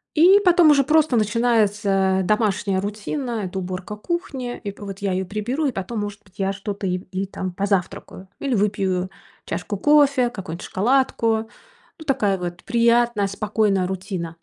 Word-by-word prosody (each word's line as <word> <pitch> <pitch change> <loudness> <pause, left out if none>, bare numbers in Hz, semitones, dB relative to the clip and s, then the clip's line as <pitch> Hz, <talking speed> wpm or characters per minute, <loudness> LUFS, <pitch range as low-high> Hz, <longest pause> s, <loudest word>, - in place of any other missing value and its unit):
И 365 +6 +7
потом 345 -3 +6
уже 280 -2 +5
просто 305 -4 +3
начинается 210 -4 +2
домашняя 205 -1 +1
рутина- 215 +3 -3
это 190 +1 -5
уборка 185 +3 -5
кухни. 265 - -4
И 200 - -4
по 205 +1 -11
вот 195 0 -7
я 200 -2 -1
её 185 0 -1
приберу, 240 - -2
и 265 - 0
потом, 210 +3 -4
может 205 0 -5
быть, 185 +1 -25
я 195 0 0
что-то 200 0 -5
ип 180 0 -3
и 190 +1 -2
там 185 -1 -5
позавтракаю 195 0 -2
или 270 -3 -1
выпью 195 -3 0 0.3
чашку 200 +3 -4
кофе, 280 -1 +4
какую-нибудь 180 -7 -7
шоколадку. 225 -1 +1 0.5
Ну, 315 - -10
такая 210 -8 +1
вот 175 +1 -6
приятная 235 -3 +2
спокойная 200 -1 0
рутина. 185 -3 -4
205 Hz, 160 wpm, -22 LUFS, 190-240 Hz, 0.5 s, И